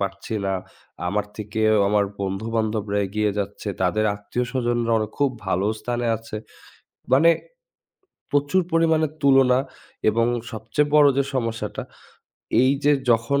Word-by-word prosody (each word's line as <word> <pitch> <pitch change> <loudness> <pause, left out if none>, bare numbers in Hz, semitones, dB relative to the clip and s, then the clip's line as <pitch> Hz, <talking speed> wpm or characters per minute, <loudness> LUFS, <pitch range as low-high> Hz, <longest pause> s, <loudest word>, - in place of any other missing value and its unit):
পারছি 100 +2 -4
না। 95 - 0 0.6
আমার 105 +2 -1
থেকেও 110 +1 +1
আমার 105 0 +3 0.2
বন্ধু-বান্ধবরা 105 +1 -1
এগিয়ে 105 +2 0
যাচ্ছে। 100 +1 -4
তাদের 95 +4 +1
আত্মীয়স্বজনরা 120 +2 -1
অন 110 - 0
খুব 140 -2 +2 0.2
ভালো 95 +1 +1
স্থানে 120 -1 -2
আছে। 110 0 -8 0.8
মানে 160 +6 +6 1.0
প্রচুর 145 +6 +2
পরিমাণে 160 -1 +3 0.2
তুলনা 135 -2 +5 0.5
এবং 115 +2 +1 0.3
সবচেয়ে 110 +7 -1
বড় 150 -1 +7
যে 140 - +3
সমস্যাটা, 115 -3 -2 0.8
এইযে 140 +3 +3 0.2
যখন 115 +5 +2
115 Hz, 115 wpm, -23 LUFS, 105-135 Hz, 1.0 s, বড়